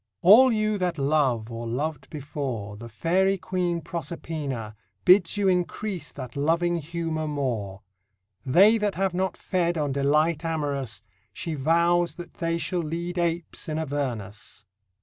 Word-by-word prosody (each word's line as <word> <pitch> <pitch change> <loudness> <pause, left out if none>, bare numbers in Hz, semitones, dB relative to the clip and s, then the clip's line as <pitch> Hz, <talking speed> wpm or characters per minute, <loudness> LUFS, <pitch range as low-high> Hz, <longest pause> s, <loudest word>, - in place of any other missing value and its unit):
All 240 +8 +8
you 215 -2 +1
that 180 -2 -1
love, 135 -6 +1
or 115 0 -5
lov'd 140 +3 -3
before, 135 -8 -5
The 115 +3 -9
Fairy 185 - +1
Queen 180 -2 -1
Proserpina 150 -8 -5 0.3
Bids 180 +1 +5
you 200 -1 +2
increase 180 -1 -1
that 130 -3 -8
loving 170 +4 +1
humour 165 0 -3
more: 115 -9 -3 0.6
They 195 - +5
that 205 -2 0
have 190 0 0
not 185 +1 -1
fed 175 -2 0
On 145 -2 0
delight 150 +4 +2
amorous, 145 -8 -2 0.3
She 165 - -4
vows 170 +4 +2
that 175 0 -9
they 165 -1 -1
shall 175 +1 -1
lead 170 +3 -3
Apes 170 0 -2
in 155 - -2
Avernus. 130 -13 -4
160 Hz, 140 wpm, -26 LUFS, 140-175 Hz, 0.6 s, All